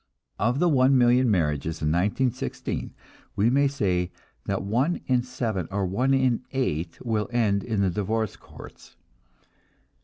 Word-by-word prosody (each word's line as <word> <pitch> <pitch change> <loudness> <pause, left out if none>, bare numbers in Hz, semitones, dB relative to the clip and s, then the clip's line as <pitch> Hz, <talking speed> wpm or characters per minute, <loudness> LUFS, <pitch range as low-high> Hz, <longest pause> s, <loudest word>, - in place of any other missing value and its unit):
Of 120 +4 +1
the 175 +4 +3
one 135 -3 +4
million 125 0 +4
marriages 80 -4 0
in 75 - +2
1916, 115 - -1 0.4
we 110 +4 +3
may 140 +2 +4
say 90 -10 0 0.4
that - - -1
one 125 - 0
in 125 -1 +2
seven 115 -8 -3
or 100 0 -1
one 125 +9 +1
in 130 -3 +2
eight 85 - -2
will 110 -3 -1
end 105 -5 +1
in 110 -4 -1
the 95 -2 +2
divorce 110 +2 -1
courts. - - -14
110 Hz, 145 wpm, -25 LUFS, 95-130 Hz, 0.4 s, one